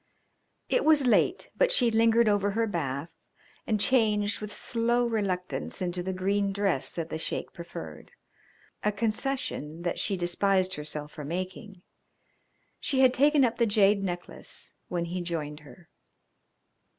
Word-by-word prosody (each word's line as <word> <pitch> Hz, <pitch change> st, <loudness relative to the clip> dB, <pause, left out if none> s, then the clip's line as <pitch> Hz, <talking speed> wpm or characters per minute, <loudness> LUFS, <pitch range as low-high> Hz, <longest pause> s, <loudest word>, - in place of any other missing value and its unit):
It -, -, +1 dB
was 305 Hz, -3 st, +5 dB
late, 250 Hz, -, +2 dB
but -, -, +3 dB
she 245 Hz, -, +4 dB
lingered 225 Hz, +1 st, +4 dB
over 205 Hz, -1 st, +2 dB
her 225 Hz, +3 st, 0 dB
bath 160 Hz, -6 st, -3 dB, 0.6 s
and 215 Hz, -2 st, +1 dB
changed 210 Hz, -3 st, +2 dB
with 210 Hz, 0 st, -6 dB
slow 240 Hz, +3 st, +1 dB
reluctance 195 Hz, -6 st, -2 dB
into 180 Hz, -1 st, -1 dB
the 190 Hz, +2 st, -3 dB
green 195 Hz, +2 st, 0 dB
dress 195 Hz, -8 st, 0 dB
that 165 Hz, -1 st, -4 dB
the 160 Hz, -, -3 dB
Sheik -, -, -4 dB
preferred 80 Hz, -, -9 dB, 0.7 s
a 210 Hz, -, +2 dB
concession 215 Hz, -, -2 dB
that 175 Hz, -, -2 dB
she 195 Hz, -, 0 dB
despised 185 Hz, +1 st, +1 dB
herself 150 Hz, -1 st, -4 dB
for 150 Hz, -, -8 dB
making. 185 Hz, +4 st, -6 dB, 1.0 s
She 265 Hz, -1 st, +1 dB
had 255 Hz, -1 st, +6 dB
taken 285 Hz, +1 st, +5 dB
up 235 Hz, -, -1 dB
the 235 Hz, -, +3 dB
jade 205 Hz, -1 st, +3 dB
necklace 175 Hz, -2 st, -5 dB
when 175 Hz, -1 st, -2 dB
he 180 Hz, +2 st, -4 dB
joined 155 Hz, -4 st, -4 dB
her. 150 Hz, +3 st, -16 dB
200 Hz, 145 wpm, -28 LUFS, 175-230 Hz, 1.0 s, had